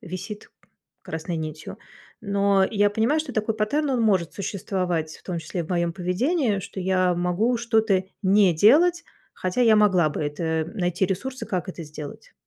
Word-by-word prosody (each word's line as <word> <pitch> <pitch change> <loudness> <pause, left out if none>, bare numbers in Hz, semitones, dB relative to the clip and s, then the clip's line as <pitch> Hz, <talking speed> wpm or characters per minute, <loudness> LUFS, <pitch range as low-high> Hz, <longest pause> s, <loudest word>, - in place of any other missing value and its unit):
висит 195 +1 -8 0.5
красной 165 +1 -5
нитью. 155 -1 -6 0.5
Но 200 -1 +2
я 205 -1 +3
понимаю, 230 +9 +1
что 290 -5 -6
такой 215 0 0
паттерн- 280 +8 0
он 255 -3 +1
может 190 -7 +2
существовать, 180 -5 -3
в - - -21
том 180 -3 -4
числе 165 +2 -4
в - - -13
моём 170 -2 0
поведении, 205 - 0
что 190 - -7
я 185 -1 +2
могу 180 +8 +1
что-то 220 -5 +2 0.2
не 190 -2 +4
делать, 325 - +4 0.3
хотя 185 +7 -2
я 225 -3 +6
могла 190 -6 +4
бы 150 - -4
это 160 +2 -1
найти 180 -1 0
ресурсы, 260 +9 -4
как 185 -2 -3
это 175 -2 -6
сделать. 150 -1 -10
190 Hz, 165 wpm, -24 LUFS, 175-220 Hz, 0.5 s, я